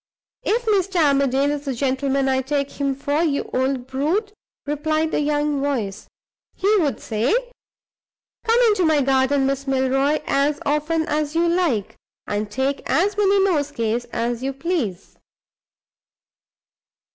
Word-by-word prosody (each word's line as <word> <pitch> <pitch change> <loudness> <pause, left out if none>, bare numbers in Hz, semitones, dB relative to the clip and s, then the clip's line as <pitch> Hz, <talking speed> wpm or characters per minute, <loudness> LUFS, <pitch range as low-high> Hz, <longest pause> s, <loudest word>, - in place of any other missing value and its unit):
"If 470 +3 0
Mr. 395 -3 +1
Armadale 280 -2 +3
is 290 0 -4
the 270 -2 -2
gentleman 270 +1 0
I 265 0 +2
take 280 +1 -2
him 275 -1 0
for, 285 +3 -1
you 300 -4 +1
old 260 -1 0
brute!" 320 - -1 0.3
replied 310 +2 -1
the - - 0
young 295 -1 0
voice, 230 -9 -2 0.5
"he 405 +3 +2
would 305 -7 0
say, 225 - 0 1.1
'Come 460 +1 +3
into 410 -4 +2
my 315 -3 +3
garden, 270 +1 +2
Miss 275 +1 -2
Milroy, 270 +2 +1
as 285 +2 +1
often 300 +3 0
as 300 0 -2
you 340 +1 +3
like, 335 - 0 0.3
and 210 0 -2
take 265 +5 -1
as 390 +5 +1
many 400 -1 +3
nosegays 275 - -1
as 235 +1 -3
you 270 +1 -2
please. 265 - -3
285 Hz, 135 wpm, -22 LUFS, 265-320 Hz, 1.1 s, Armadale